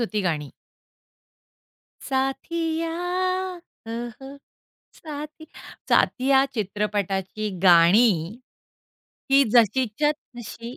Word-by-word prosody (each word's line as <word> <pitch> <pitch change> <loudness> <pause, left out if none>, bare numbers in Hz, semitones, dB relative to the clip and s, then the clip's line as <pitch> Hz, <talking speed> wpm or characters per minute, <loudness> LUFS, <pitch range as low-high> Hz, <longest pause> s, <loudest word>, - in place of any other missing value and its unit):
होती 215 -2 -1
गाणी. 150 -4 -3 1.6
साथिया 320 +5 -2 1.0
हो, 225 - -6 0.3
हो. 270 +1 -10 0.6
साथी 305 0 -9 0.4
साथिया 265 +1 +3
चित्रपटाची 205 -1 -2
गाणी. 180 +3 +4 0.9
ही 275 +1 +6
जशीच्या 245 +4 +3 0.3
तशी 235 +1 -8
235 Hz, 65 wpm, -24 LUFS, 205-275 Hz, 1.6 s, ही